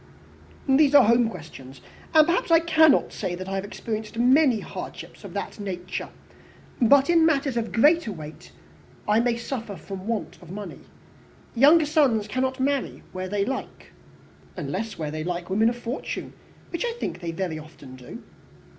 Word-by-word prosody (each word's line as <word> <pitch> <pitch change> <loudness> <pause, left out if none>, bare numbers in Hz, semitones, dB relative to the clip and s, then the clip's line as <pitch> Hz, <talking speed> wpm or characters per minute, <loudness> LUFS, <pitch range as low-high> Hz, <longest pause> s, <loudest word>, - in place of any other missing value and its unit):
"These 280 +1 +4
are - - +9
home 235 +1 +4
questions 135 - -11 0.4
and 310 -1 +8
perhaps 345 +2 0
I 330 -1 +6
cannot 315 -3 +4
say 185 -4 -3
that 185 +1 -7
I 195 - -4
have 195 0 -2
experienced 215 +2 -6
many 255 0 +4
hardships - - -9
of - - -10
that - - -5
nature. 185 -3 -5 0.7
But 270 +4 +5
in 340 -1 +4
matters 280 -5 +2
of 230 -1 -2
greater 295 0 +3
weight, 155 -3 -10 0.6
I 210 +1 +4
may 235 0 +1
suffer 235 -3 -5
from 190 +2 -8
the 185 - -11
want 230 -1 -4
of 175 - -14
money. 205 +2 -7 0.7
Younger 295 +6 +6
sons 275 -9 +2
cannot 260 +3 -2
marry 275 +1 -1
where 185 0 -5
they 200 0 0
like." 265 +3 -6 0.7
"Unless 225 -1 -4
where 155 -2 -4
they 155 0 -4
like 175 +1 -4
women 220 +4 +3
of 240 - -4
fortune, 240 +3 -5 0.4
which 340 - -3
I 475 -1 -1
think 180 - -5
they 170 -2 -4
very 165 -2 -3
often 150 -4 -13
do." 125 -1 -11
225 Hz, 170 wpm, -25 LUFS, 185-275 Hz, 0.7 s, are